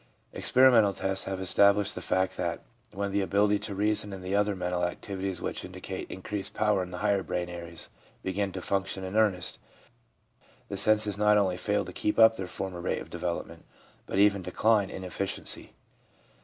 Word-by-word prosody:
Experimental 120 -6 +5
tests 95 0 +1
have 95 -1 -3
established 100 +2 +4
the 90 - -6
fact 95 +1 0
that 85 -1 -3 0.3
when 100 0 -3
the 100 +1 +1
ability 100 +1 +2
to 100 - -5
reason 105 0 0
and 95 -1 -8
the 95 +2 -2
other 105 0 +2
mental 90 -1 -2
activities 95 +1 -3
which - - -3
indicate - - -7
increased 95 +1 -5
power 105 -2 +2
in 90 - -5
the 90 - -7
higher 100 -2 +2
brain 90 -1 -3
areas 85 -1 -7 0.3
begin 95 +1 -1
to 95 - -6
function 95 0 -2
in 95 +2 -5
earnest, 105 -5 +1 1.1
the - - -4
senses 105 0 +2
not 105 0 +5
only 95 -3 +2
fail 105 +2 -1
to 90 - -9
keep 105 - -1
up 110 0 +7
their 95 -3 -5
former 90 -1 -5
rate - - -1
of - - -10
development, 85 -1 -4 0.4
but - - -3
even 100 -1 +4
decline 105 +1 +2
in 95 - -7
efficiency. 95 +1 0
95 Hz, 180 wpm, -28 LUFS, 90-105 Hz, 1.1 s, up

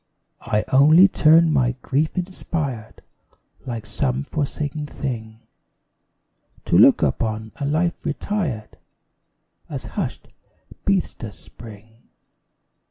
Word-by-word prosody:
I 105 -2 +1
only 155 +8 +7
turn, 160 -2 +4
by 125 -3 +2
grief 150 +6 0
inspired, 155 - -4 0.6
Like 115 -3 -5
some 130 +5 -1
forsaken 145 0 -3
thing, 115 -6 -6 1.2
To - - +1
look - - +6
upon 110 0 -1
a 140 - -3
life 165 +4 0
retired 155 - -3 0.9
As - - -6
hushed - - -4 0.6
Bethesda's 175 - -1
spring. 110 +1 -15
140 Hz, 95 wpm, -22 LUFS, 115-155 Hz, 1.2 s, only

